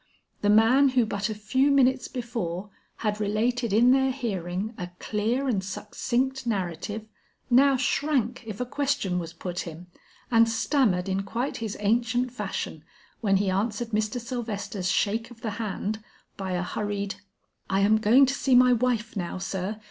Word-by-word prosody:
The 205 Hz, -, +2 dB
man 230 Hz, +6 st, +6 dB
who 240 Hz, -, +5 dB
but 205 Hz, 0 st, -2 dB
a 215 Hz, -, -3 dB
few 260 Hz, +7 st, +1 dB
minutes 265 Hz, -2 st, +3 dB
before 210 Hz, -6 st, -4 dB, 0.3 s
had 210 Hz, 0 st, 0 dB
related 230 Hz, +3 st, 0 dB
in 235 Hz, +5 st, +5 dB
their 265 Hz, 0 st, +4 dB
hearing 205 Hz, -5 st, -3 dB
a 180 Hz, -3 st, -6 dB
clear 230 Hz, +6 st, -1 dB
and 205 Hz, -7 st, 0 dB
succinct 245 Hz, +7 st, -2 dB
narrative, 200 Hz, +1 st, -3 dB, 0.5 s
now 270 Hz, +2 st, +6 dB
shrank 260 Hz, -3 st, 0 dB
if 210 Hz, -2 st, -6 dB
a 250 Hz, -, -1 dB
question 265 Hz, -9 st, -1 dB
was 165 Hz, -1 st, -5 dB
put 175 Hz, +1 st, -5 dB
him, 170 Hz, +1 st, -6 dB, 0.5 s
and 230 Hz, -1 st, +5 dB
stammered 225 Hz, -5 st, +1 dB
in 195 Hz, 0 st, 0 dB
quite 230 Hz, +7 st, -3 dB
his 220 Hz, -3 st, -4 dB
ancient 235 Hz, +4 st, +1 dB
fashion, 250 Hz, -, -4 dB, 0.4 s
when 195 Hz, -3 st, +2 dB
he 195 Hz, -1 st, +1 dB
answered 215 Hz, +4 st, -1 dB
Mr. 215 Hz, +2 st, -1 dB
Sylvester's 210 Hz, -6 st, -4 dB
shake 220 Hz, +4 st, 0 dB
of 235 Hz, -2 st, -15 dB
the 220 Hz, -, -2 dB
hand, 215 Hz, 0 st, -3 dB, 0.3 s
by 190 Hz, -2 st, -4 dB
a 180 Hz, 0 st, 0 dB
hurried: 200 Hz, +1 st, -3 dB, 0.5 s
"I 195 Hz, 0 st, +2 dB
am 215 Hz, +2 st, +4 dB
going 235 Hz, +6 st, +6 dB
to 270 Hz, -, -1 dB
see 270 Hz, -2 st, +2 dB
my 250 Hz, 0 st, +7 dB
wife 235 Hz, -2 st, 0 dB
now, 180 Hz, -2 st, -3 dB
sir. 190 Hz, +2 st, -3 dB
220 Hz, 165 wpm, -26 LUFS, 195-250 Hz, 0.5 s, my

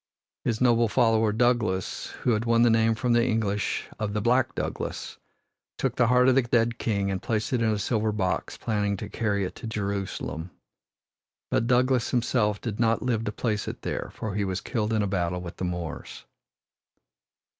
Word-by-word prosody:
His 115 Hz, -2 st, 0 dB
noble 120 Hz, -2 st, +4 dB
follower, 110 Hz, -2 st, +3 dB
Douglas, 115 Hz, -5 st, 0 dB, 0.2 s
who 125 Hz, -, +3 dB
had 110 Hz, 0 st, +1 dB
won 115 Hz, 0 st, +4 dB
the 120 Hz, -, +5 dB
name 115 Hz, 0 st, +3 dB
from 120 Hz, +1 st, +1 dB
the 120 Hz, 0 st, +4 dB
English 110 Hz, -4 st, 0 dB
of 105 Hz, -1 st, -2 dB
"the 105 Hz, -, 0 dB
black 120 Hz, +3 st, +2 dB
Douglas," -, -, -4 dB, 0.6 s
took -, -, -1 dB
the 120 Hz, -, +3 dB
heart 125 Hz, +1 st, +5 dB
of 130 Hz, -, +6 dB
the 135 Hz, -, +5 dB
dead 120 Hz, -1 st, +1 dB
king 100 Hz, -3 st, 0 dB
and 95 Hz, -, -2 dB
placed 110 Hz, +1 st, -1 dB
it 125 Hz, -, +1 dB
in 115 Hz, -, +3 dB
a 110 Hz, -, +1 dB
silver 110 Hz, +1 st, 0 dB
box, 95 Hz, -3 st, -2 dB
planning 105 Hz, -3 st, -1 dB
to 105 Hz, -, -6 dB
carry 105 Hz, -2 st, -1 dB
it -, -, -5 dB
to -, -, -7 dB
Jerusalem. 100 Hz, -6 st, -3 dB, 1.0 s
But 115 Hz, -, +1 dB
Douglas 125 Hz, 0 st, +3 dB
himself 115 Hz, -4 st, +1 dB
did 110 Hz, -3 st, -5 dB
not 115 Hz, -1 st, +2 dB
live 115 Hz, -3 st, 0 dB
to 105 Hz, -, -1 dB
place 105 Hz, -1 st, -2 dB
it -, -, -6 dB
there, -, -, -3 dB
for 110 Hz, -3 st, -4 dB
he 105 Hz, +1 st, 0 dB
was 95 Hz, -1 st, -2 dB
killed 110 Hz, -3 st, -2 dB
in 110 Hz, -2 st, +2 dB
a -, -, 0 dB
battle 90 Hz, -2 st, -1 dB
with 85 Hz, -1 st, -8 dB
the 95 Hz, -, -2 dB
Moors. 90 Hz, -2 st, -5 dB
110 Hz, 190 wpm, -26 LUFS, 100-120 Hz, 1.0 s, of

